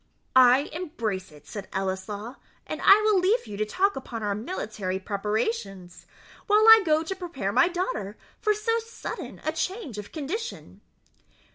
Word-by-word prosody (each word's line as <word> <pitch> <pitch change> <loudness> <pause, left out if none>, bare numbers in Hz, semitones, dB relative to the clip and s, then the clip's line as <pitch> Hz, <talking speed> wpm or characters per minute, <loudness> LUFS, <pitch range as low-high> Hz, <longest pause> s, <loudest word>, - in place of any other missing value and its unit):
"I 255 +1 +7
embrace 230 - -4
it," 150 -1 -17
said 200 +4 -7
Ellieslaw; 195 +5 -4 0.3
"and - - -5
I 405 +2 +7
will 425 -3 +4
leave 400 +7 +2
you 210 - -7
to 215 - 0
talk 390 - +1
upon 235 -4 -6
our 205 -1 0
military 215 - -4
preparations, 200 - -3 0.4
while 425 0 +5
I 445 0 +10
go 315 -2 +2
to 385 +4 -4
prepare 335 - -4
my 340 - +4
daughter 280 - -3 0.2
for 425 0 +2
so 455 +2 0
sudden 455 0 -7
a 310 - +1
change 320 - -4
of 205 - -9
condition." 365 - -6
270 Hz, 155 wpm, -26 LUFS, -, 0.4 s, I